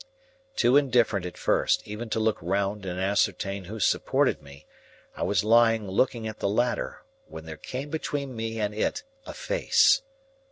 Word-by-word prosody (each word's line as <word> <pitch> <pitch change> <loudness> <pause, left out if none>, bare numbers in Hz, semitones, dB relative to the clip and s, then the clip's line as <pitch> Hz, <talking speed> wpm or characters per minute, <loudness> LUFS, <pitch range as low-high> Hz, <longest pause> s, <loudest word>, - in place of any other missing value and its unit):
Too 130 - +4
indifferent 120 -9 +2
at 90 - -10
first, - - +1
even 110 +3 -6
to 110 - -1
look 110 -1 +1
round 100 +3 -1
and 90 0 -4
ascertain 100 0 0
who 110 +5 -7
supported - - +1
me, 70 +2 -14 0.5
I - - -8
was 100 -2 +1
lying 115 -1 +4
looking 110 +3 0
at 110 - -7
the 100 - 0
ladder, 120 +4 -1 0.2
when 80 0 -10
there 80 -1 -7
came 135 - -6
between 140 -4 -3
me 115 0 -4
and 105 -1 -1
it 285 - -1 0.2
a - - -6
face. - - +3
110 Hz, 165 wpm, -26 LUFS, 95-120 Hz, 0.5 s, Too